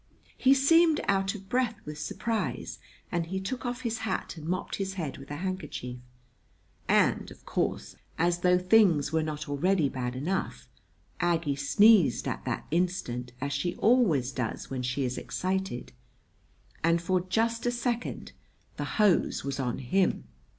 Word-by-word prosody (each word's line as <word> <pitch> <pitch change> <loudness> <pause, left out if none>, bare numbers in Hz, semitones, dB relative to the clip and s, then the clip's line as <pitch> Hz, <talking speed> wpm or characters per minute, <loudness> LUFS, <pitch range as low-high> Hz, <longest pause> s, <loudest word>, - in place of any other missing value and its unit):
He 265 +1 +5
seemed 320 +3 +5
out 195 +1 +1
of 195 -2 -10
breath 245 -1 +1
with 150 0 -7
surprise; 225 -1 -3 0.3
and 170 -2 -1
he 190 +2 -2
took 245 +6 -4
off 245 +1 -3
his 230 -3 -2
hat 205 -4 -3
and 160 -1 -8
mopped 185 +2 -2
his 195 -1 -3
head 155 -8 -4
with 135 - -12
a 145 - -4
handkerchief. 150 -8 -5 0.9
And, - - +3
of - - -15
course, - - -2 0.2
as 175 +1 +2
though 180 0 +4
things 180 -6 +4
were 160 - +3
not 155 0 -4
already 150 +2 +2
bad 125 -2 -3
enough, 175 +9 -3 0.5
Aggie 165 -5 +1
sneezed 175 - +4
at - - -4
that - - -2
instant, 165 -9 -1
as 140 +1 -2
she 175 +6 -1
always 185 - +3
does 125 -1 -4
when 130 -1 -2
she 125 +2 -1
is 125 0 -2
excited; 190 -8 -3 0.9
and 170 +1 +3
for 180 +2 +1
just 225 +6 0
a - - +3
second 240 0 -3 0.5
the - - -2
hose 210 -5 +3
was 140 0 -3
on 125 -3 -1
him. 155 - +1
180 Hz, 155 wpm, -28 LUFS, 145-210 Hz, 0.9 s, He